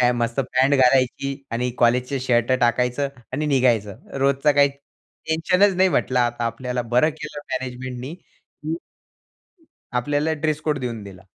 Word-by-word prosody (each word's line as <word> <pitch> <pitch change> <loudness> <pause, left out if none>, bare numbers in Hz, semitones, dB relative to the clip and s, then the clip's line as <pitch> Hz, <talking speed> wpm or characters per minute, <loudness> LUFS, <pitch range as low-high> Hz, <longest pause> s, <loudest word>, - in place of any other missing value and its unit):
मस्त 120 +2 -1
पॅन्ट 130 +1 +2
घालायची 130 +1 +2 0.2
आणि 125 +2 -1
कॉलेजचे 125 +3 +2
शर्ट 120 -1 +1
टाकायचं 125 +3 +1 0.2
आणि 155 - -1
निघायचं. 120 -8 +1 0.2
रोजचा 140 +2 +3
काही 140 0 +4
टेन्शनच 165 +7 -1
नाही 190 0 +4
म्हंटलं 130 -5 +1
आता 120 -1 0
आपल्याला 125 +2 -3
बरं 125 +6 +5
केलं 155 -1 -8
मॅनेजमेंटनी, 130 +2 -5
की 160 -3 -9 1.3
आपल्याला 145 +4 0
ड्रेस 155 0 -1
कोड 150 -2 -1
देऊन 120 -4 -4
दिला. 95 -2 -12
130 Hz, 130 wpm, -22 LUFS, 125-150 Hz, 1.3 s, बरं